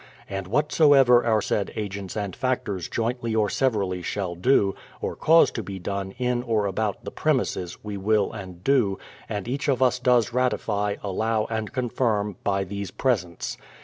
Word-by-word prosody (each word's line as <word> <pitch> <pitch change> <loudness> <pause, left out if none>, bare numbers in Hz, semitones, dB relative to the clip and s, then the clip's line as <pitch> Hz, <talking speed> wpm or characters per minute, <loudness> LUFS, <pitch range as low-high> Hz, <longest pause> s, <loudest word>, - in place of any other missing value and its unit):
And 95 -1 -4
whatsoever 135 - +5
our 110 -3 +2
said 100 - -1
agents 100 -2 -5
and 100 -3 -3
factors 115 -9 -2
jointly 115 0 -1
or 105 -2 +2
severally 100 -9 0
shall 90 0 -3
do, 100 +1 +3 0.3
or - - -3
cause 165 +1 +5
to 115 - -4
be 100 -2 -6
done, 95 +1 -4
in 125 -1 0
or 115 -4 0
about 100 +1 -2
the - - -5
premises, 90 -1 -1
we 105 -1 -5
will 105 +1 +1
and 95 -4 -9
do, 120 -8 +2 0.3
and 105 -1 -4
each 135 +4 -2
of 135 -3 +2
us 125 0 +2
does 125 -3 +3
ratify, 105 -5 0
allow, 110 +2 0
and 110 -1 -2
confirm, 110 -6 -1
by 100 -1 +1
these 100 0 -5
presents. 95 -9 -1
105 Hz, 165 wpm, -25 LUFS, 100-125 Hz, 0.3 s, whatsoever